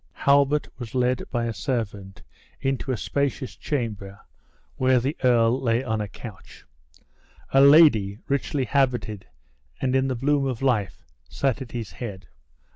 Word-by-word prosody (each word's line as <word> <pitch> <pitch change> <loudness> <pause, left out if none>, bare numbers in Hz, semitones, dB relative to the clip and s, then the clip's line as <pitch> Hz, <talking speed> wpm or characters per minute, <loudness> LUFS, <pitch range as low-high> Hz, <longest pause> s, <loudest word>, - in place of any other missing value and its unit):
Halbert 140 +1 +2
was 120 -1 -7
led 125 0 0
by 120 -2 -1
a 115 - -2
servant 105 -5 -4 0.4
into 135 0 -2
a 125 - -1
spacious 140 +2 -2
chamber, 105 -8 -4 0.6
where 130 -1 +3
the 135 +6 -2
earl 120 0 +3
lay 120 0 +1
on 110 -4 -2
a 105 - -3
couch. 100 0 -12 0.9
A 135 - +6
lady, 140 -9 +6
richly 140 0 -1
habited, 125 -7 0 0.5
and 130 0 0
in 135 0 +2
the 130 - -1
bloom 140 +2 +1
of 130 -1 -4
life, 110 -9 0 0.3
sat 135 -1 -1
at 125 - -8
his 115 -7 -5
head. 95 0 -8
125 Hz, 145 wpm, -24 LUFS, 110-135 Hz, 0.9 s, A